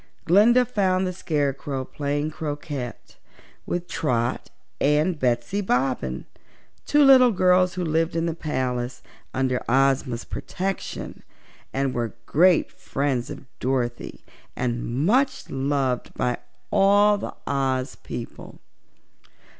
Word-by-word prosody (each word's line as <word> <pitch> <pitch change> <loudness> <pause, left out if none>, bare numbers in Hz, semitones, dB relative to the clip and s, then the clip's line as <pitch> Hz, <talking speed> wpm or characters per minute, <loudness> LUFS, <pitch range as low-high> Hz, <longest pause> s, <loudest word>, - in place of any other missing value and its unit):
Glinda 220 +8 +5
found 190 -5 +1
the 185 - -2
Scarecrow 140 -5 -2
playing 145 +2 -2
croquet 145 -5 -4 0.7
with 175 0 -2
Trot 120 -5 -1 0.3
and 150 +4 +2
Betsy 125 +10 0
Bobbin, 125 - -1 0.6
two 295 0 +5
little 260 -2 +8
girls 180 -2 +3
who 180 - -2
lived 160 +1 0
at 165 0 0
the 165 - -1
palace 130 -5 -3 0.3
under 130 -1 0
Ozma's 130 -2 +2
protection 190 +1 -5 0.5
and 135 -1 -1
were 120 -2 -3
great 175 +2 +4
friends 135 -3 -2
of - - -8
Dorothy 125 -2 -2 0.3
and 120 +2 -2
much 265 +6 +1
loved 135 -2 -1
by 125 -1 -1 0.3
all 205 +1 +5
the - - -6
Oz 135 -1 -1
people. 120 - -8
145 Hz, 110 wpm, -24 LUFS, 130-185 Hz, 0.7 s, little